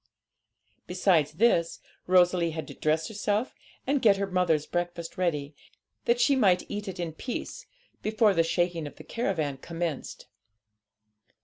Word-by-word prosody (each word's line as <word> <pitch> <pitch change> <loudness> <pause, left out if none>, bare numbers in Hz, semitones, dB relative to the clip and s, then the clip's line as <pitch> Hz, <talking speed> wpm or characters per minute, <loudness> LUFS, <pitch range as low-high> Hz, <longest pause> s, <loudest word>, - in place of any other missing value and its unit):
Besides 180 -5 +2
this, 170 -3 +2 0.3
Rosalie 180 -1 +4
had 160 - -4
to - - -7
dress 155 +1 0
herself 210 +2 -1 0.3
and 275 0 +1
get 205 -3 +5
her 200 - 0
mother's 180 -5 +1
breakfast 175 -1 -4
ready, 150 -5 -1 0.5
that 235 +1 +2
she 280 +2 +4
might 190 -8 +3
eat 205 0 -4
it 185 -1 -6
in 170 -2 -3
peace 245 - -6 0.3
before 215 -1 +3
the 165 - +3
shaking 170 -1 0
of - - -11
the - - -12
caravan 160 - -2
commenced. 165 +1 -5
180 Hz, 140 wpm, -28 LUFS, 165-205 Hz, 0.5 s, get